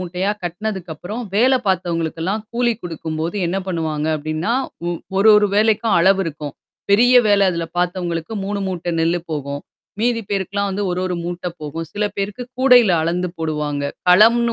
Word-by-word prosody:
மூட்டையா 180 +2 -2
கட்டனதுக்கப்புறம், 180 +2 -5
வேல 250 +6 +4
பார்த்தவங்களுக்கெல்லாம் 175 +2 -1
கூலி 240 0 +2
குடுக்கும்போது 165 +1 -4
என்ன 180 +3 -1
பண்ணுவாங்க 160 -4 -2
அப்டின்னா, 155 +7 -2 0.4
ஒ - - 0 0.3
1, 210 +3 +5
1 210 0 +4
வேலைக்கும் 220 -1 +3
அளவு 190 +3 +4
இருக்கும். 150 -3 -5 0.4
பெரிய 240 +5 +5
வேலை 205 -1 +4
அதில 170 -1 -2
பார்த்தவங்களுக்கு 175 0 -2
3 200 +1 -2
மூட்ட 175 -2 -3
நெல்லு 170 +1 +1
போகும். 145 -2 -4 0.4
மீதி 235 0 +1
பேருக்குலாம் 200 +1 -1
வந்து 200 +2 -2
1, 180 +1 -1
1 180 - -2
மூட்டை 175 +1 -4
போகும். 155 +2 -5
சில 210 +1 -1
பேருக்கு 200 +5 -3 0.2
கூடையில 250 -7 +6
அளந்து 175 +2 -1
போடுவாங்க. 150 -3 -2 0.3
களம்னு 230 +6 +6
180 Hz, 150 wpm, -20 LUFS, 165-210 Hz, 0.4 s, கூடையில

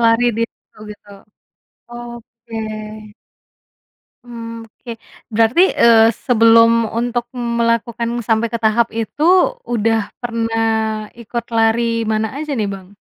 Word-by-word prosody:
Lari 230 +1 +3
di 230 - 0
situ - - -29
gitu? 205 0 -13 0.8
Oke. 235 -1 -11 1.7
Mmm, 230 -1 -8
oke. 230 +2 -11 0.4
Berarti, 225 +8 +3 0.2
eee, 225 -1 +6 0.2
sebelum 230 -1 +5
untuk 240 +2 -2
melakukan 235 -1 -1 0.2
sampai 225 +1 +1
ke 235 - -1
tahap 225 +2 +3
itu 230 +6 -4 0.5
udah 225 -2 0
pernah 230 -1 -1 0.6
ikut 235 +1 -5
lari 225 +1 +3 0.3
mana 220 0 0
aja 305 0 -5
nih, 210 -3 -1
Bang? 195 +1 -11
230 Hz, 110 wpm, -18 LUFS, 225-235 Hz, 1.7 s, eee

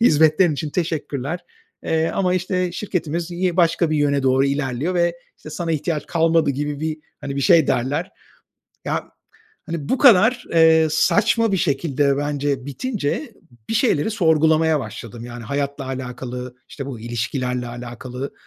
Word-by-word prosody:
hizmetlerin 160 -4 +4
için 150 +1 -4
teşekkürler, 160 -2 -3 0.4
eee, 160 0 +1
ama, 185 -2 +1
işte, 185 -1 -1
şirketimiz 175 -3 -3
yi 180 0 -1
başka 170 -1 +3
bir 155 - +1
yöne 140 -1 +2
doğru 135 +1 +3
ilerliyor 140 +4 -1
ve, 170 -1 +1 0.2
işte, 155 - -11
sana 165 +1 -3
ihtiyaç 155 0 -2
kalmadı." 165 -2 +2
gibi 145 +1 -3
bir, 155 0 -2 0.2
hani, 140 0 -5
bir - - 0
şey 160 +1 +5
derler. 145 +9 -1 0.7
Ya, - - -2 0.6
hani, 165 -4 -5
bu 260 - +1
kadar, 240 0 +5
eee, 160 -1 +5
saçma 210 +7 +2
bir 195 - +3
şekilde 140 -3 +1
bence 145 -2 -2
bitince 215 - -3 0.4
bir - - -1
şeyleri 220 - +2
sorgulamaya 160 -5 +3
başladım. 115 0 -8
Yani, 120 -1 -8
hayatla 140 +2 -3
alakalı, 125 -1 -6
işte, 140 -2 -7
bu 125 -5 -7
ilişkilerle 125 +2 -2
alakalı 125 +2 -7
155 Hz, 145 wpm, -21 LUFS, 135-170 Hz, 0.7 s, şey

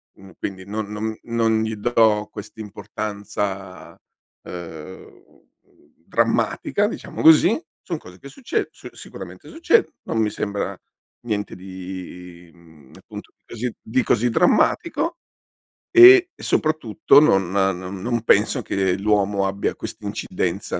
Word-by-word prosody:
mhmm, 95 -1 -15
quindi 95 -1 -5
non 105 +1 -5
non 110 +1 -3
non 115 -1 +1
gli 110 0 -2
do 110 -1 +2
quest'importanza, 100 -2 -6 0.5
ehm, 85 0 -10 0.8
drammatica, - - +1
diciamo - - -6
così. 165 - +6 0.2
Son 170 -3 -4
cose 90 -8 -14
che - - -11
succedo 260 - -3
s - - -12
sicuramente - - -11
succed 335 +7 +2 0.2
non - - -3
mi 110 - +2
sembra 100 -1 -3 0.5
niente 105 -2 -3
di, 90 -2 -9
mhmm, 80 -5 -20
appunto - - -11
così 120 +1 -4
di 125 +3 0
così 120 +2 +2
drammatico, 330 - +2 0.7
e 370 0 +9
soprattutto 145 - +3
non 95 - +3
non 95 -1 -1
non 120 +1 -1
penso 115 +5 +3
che 95 -2 0
l'uomo 100 -1 +1
abbia 100 +1 -2
quest'incidenza - - -4
105 Hz, 115 wpm, -22 LUFS, 95-120 Hz, 0.8 s, e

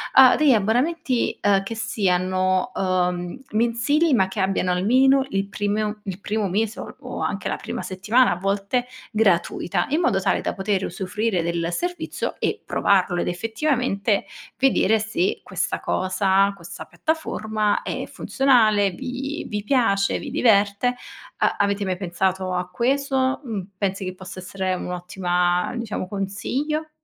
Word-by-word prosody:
uhm, 260 -1 +8
degli 305 -2 +5
abbonamenti, 250 +6 +1
ehm, 200 -1 +3
che 195 - -5
siano, 185 -1 +1
uhm, 180 +2 -1
mensili, 240 +8 +2
ma 190 -6 +4
che 190 +1 -3
abbiano 190 -1 +1
almeno 260 +9 +4
il 195 -3 -1
primo 210 +1 -2
il 190 -1 -5
primo 210 -1 -1
mese, 215 +3 -1
o - - -9
o - - -6
anche - - -2
la - - -1
prima - - -5
settimana 210 +6 +2
a - - +1
volte, 200 +6 -1 0.2
gratuita 195 -6 +1
in 310 +4 +2
modo 260 - +2
tale 195 - +1
da - - -2
poter 195 0 -1
usufruire 190 +1 -2
del 170 0 -1
servizio 355 - -3
e - - -1
provarlo 180 -3 +2
ed - - -2
effettivamente 225 +1 0 0.3
vedere 225 -5 +3
se 335 - -1
questa - - -2
cosa, 190 +1 +2
questa 170 -2 -9
piattaforma 220 -10 -1
è - - -3
funzionale, 220 -7 +3
vi 265 - -5
vi 210 -1 -3
piace, 205 -5 +2
vi 290 - -6
diverte. 220 -2 +3 0.4
A - - +1
avete 200 0 +1
mai 185 -1 -1
pensato 185 0 -1
a 180 0 -1
questo? 265 +5 +1
Mhmm, 225 -7 -3 0.2
pensi 195 0 -1
che 185 - -4
possa 185 0 -9
essere 185 0 -3
un'ottima, 180 0 -1
diciamo, 225 -5 -3
consiglio? 260 +11 -2
205 Hz, 145 wpm, -23 LUFS, 185-245 Hz, 0.4 s, uhm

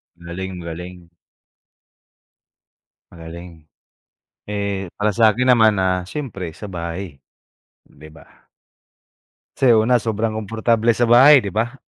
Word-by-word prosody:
Magaling-magaling. 90 0 -8 2.0
Magaling. 85 -1 -12 0.8
Eh, 100 -2 -3
para 105 +1 0
sakin 115 +4 +2
naman, 110 -3 +5
ah, 90 -1 0
syempre 100 - -6
sa 105 - -9
bahay, 85 -2 -6 0.7
di 75 +2 -16
ba? 80 - -21 1.1
Kasi, 125 -4 +4
una 120 +3 +3
sobrang 110 0 -2
komportable 115 +2 0
sa 120 - 0
bahay, 130 +2 +6
di 100 - -5
ba? 115 +5 -2
100 Hz, 100 wpm, -20 LUFS, 85-115 Hz, 2.0 s, bahay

